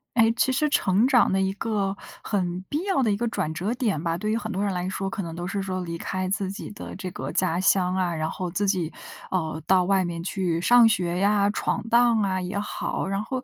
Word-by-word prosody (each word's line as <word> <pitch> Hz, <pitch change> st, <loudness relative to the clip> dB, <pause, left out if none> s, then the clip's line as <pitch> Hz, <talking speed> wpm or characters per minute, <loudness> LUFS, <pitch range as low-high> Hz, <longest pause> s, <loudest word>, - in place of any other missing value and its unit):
诶， 225 Hz, -1 st, +5 dB
其 265 Hz, -, +3 dB
实 300 Hz, +4 st, +1 dB
成 210 Hz, -4 st, +3 dB
长 255 Hz, -3 st, +4 dB
的 190 Hz, -, +2 dB
一 190 Hz, 0 st, +1 dB
个 200 Hz, -2 st, -2 dB, 0.3 s
很 180 Hz, -3 st, -1 dB
必 300 Hz, +4 st, -1 dB
要 385 Hz, -8 st, +1 dB
的 225 Hz, -4 st, +2 dB
一 200 Hz, -, 0 dB
个 240 Hz, +2 st, -1 dB
转 190 Hz, -9 st, -2 dB
折 185 Hz, +8 st, -2 dB
点 220 Hz, -, -1 dB
吧， 165 Hz, -1 st, 0 dB
对 210 Hz, +5 st, -3 dB
于 220 Hz, -, +1 dB
很 220 Hz, -1 st, -4 dB
多 195 Hz, 0 st, -1 dB
人 200 Hz, -, 0 dB
来 180 Hz, 0 st, -2 dB
说， 195 Hz, 0 st, -3 dB
可 200 Hz, 0 st, -4 dB
能 165 Hz, -1 st, -6 dB
都 175 Hz, +1 st, -4 dB
是 200 Hz, +1 st, -2 dB
说 185 Hz, -1 st, -3 dB
离 170 Hz, -1 st, -5 dB
开 185 Hz, +1 st, -3 dB
自 195 Hz, -1 st, -1 dB
己 200 Hz, -, -7 dB
的 -, -, -8 dB
这 185 Hz, -1 st, -5 dB
个 -, -, -5 dB
家 180 Hz, -2 st, +1 dB
乡 185 Hz, -1 st, +3 dB
啊， 180 Hz, -2 st, 0 dB
然 155 Hz, -1 st, -2 dB
后 180 Hz, 0 st, -4 dB
自 200 Hz, +3 st, 0 dB
己 180 Hz, -5 st, 0 dB, 0.4 s
哦， 160 Hz, -4 st, -1 dB
到 185 Hz, -1 st, +4 dB
外 190 Hz, 0 st, +2 dB
面 170 Hz, -1 st, -4 dB
去 175 Hz, -3 st, -1 dB
上 240 Hz, +4 st, +7 dB
学 180 Hz, -5 st, 0 dB
呀， 200 Hz, +1 st, +3 dB
闯 205 Hz, -, -1 dB
荡 235 Hz, -1 st, +4 dB
啊 190 Hz, -2 st, 0 dB
也 185 Hz, +2 st, -3 dB
好。 205 Hz, -, -3 dB
然 195 Hz, +1 st, -1 dB
后 255 Hz, +3 st, -4 dB
195 Hz, 265 characters per minute, -25 LUFS, 180-215 Hz, 0.4 s, 上